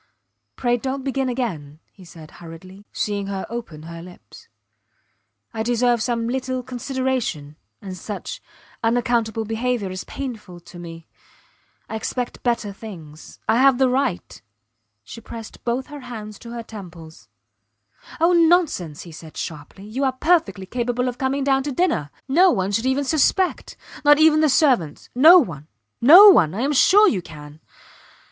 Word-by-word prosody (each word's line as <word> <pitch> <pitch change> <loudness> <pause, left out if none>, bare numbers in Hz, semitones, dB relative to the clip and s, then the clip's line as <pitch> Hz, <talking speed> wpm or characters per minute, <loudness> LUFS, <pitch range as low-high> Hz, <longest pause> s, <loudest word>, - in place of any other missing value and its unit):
Pray, 245 -1 0
dont 265 +2 -4
begin 270 -1 -1
again, 165 - -4
he 190 - -17
said, 165 -3 -13
hurriedly, 185 +4 -12
seeing 205 -1 -3
her 195 -1 -4
open 225 -11 -7
her 165 +1 -9
lips. 180 +1 -15 1.1
I 220 - -3
deserve 240 0 +1
some 230 -1 -1
little 255 0 -3
consideration 250 - -3 0.3
and 190 -2 -7
such 205 +4 -7 0.4
unaccountable 230 -1 0
behaviour 225 -2 -2
is 185 0 -6
painful 220 -10 -7
to 175 +1 -13
me. 165 -1 -10 0.8
I - - -6
expect 245 +2 -4
better 235 -4 -1
things.... 165 -8 -11
I 225 - +3
have 270 -1 +5
the 265 -1 +3
right.... 255 -8 -2 0.6
She 170 - -11
pressed 225 0 -10
both 245 +2 -2
her 290 - -7
hands 220 -5 -9
to 235 - -11
her 235 0 -6
temples. 175 - -12 0.9
Oh, 335 +2 +3
nonsense! 325 - +2
he 170 - -12
said, 160 0 -12
sharply. 160 +5 -8
You 235 +6 -4
are 265 -1 +1
perfectly 310 - +1
capable 245 +3 -2
of 245 0 -8
coming 270 +1 -1
down 270 -1 +2
to 285 +2 -4
dinner. 250 - 0 0.2
No 350 +8 +5
one 190 - 0
should 225 +5 0
even 265 +2 +1
suspect; 320 +6 0 0.3
not 295 0 +6
even 310 0 +5
the 310 -1 +3
servants. 255 - +1
No 315 +9 +8
one! 160 - -1 0.3
No 350 - +10
one!... 170 - +4
I 220 - -3
am 285 +3 0
sure 410 +9 +6
you 195 - 0
can. 150 -2 -12
235 Hz, 155 wpm, -21 LUFS, 185-265 Hz, 1.1 s, No